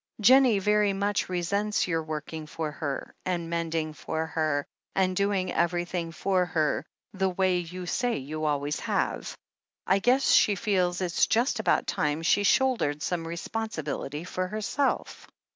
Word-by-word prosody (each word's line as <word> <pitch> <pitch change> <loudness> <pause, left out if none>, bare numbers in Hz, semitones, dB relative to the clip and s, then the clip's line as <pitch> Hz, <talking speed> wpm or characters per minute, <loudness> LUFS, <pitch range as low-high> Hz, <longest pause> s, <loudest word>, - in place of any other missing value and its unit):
Jennie 250 0 +6
very 210 +1 +2
much 200 0 -1
resents 200 +4 0
your 165 -2 0
working 155 0 -6
for 155 0 -4
her, 145 -3 -4
and 170 -2 -2
mending 165 -2 -1
for 160 +1 -3
her, 155 -3 -1 0.3
and 185 -1 +2
doing 200 -1 0
everything 175 -1 -1
for 185 +2 +1
her, 160 -4 0 0.3
the 190 -1 +1
way 185 0 +1
you 180 +1 -6
say 245 +6 0
you 155 +3 -4
always 145 0 0
have. - - -2 0.5
I 195 +1 +3
guess 250 +6 +3
she 205 - +5
feels 185 -3 0
it 175 -3 +2
just 240 +1 +2
about 220 - +2
time 150 +2 -1
she 195 +4 +3
shouldered 205 - +2
some 170 -2 -2
responsibility 165 -5 -4
for 185 +1 -3
her 215 +3 -4
self." 275 +6 -1
180 Hz, 150 wpm, -27 LUFS, 160-200 Hz, 0.5 s, Jennie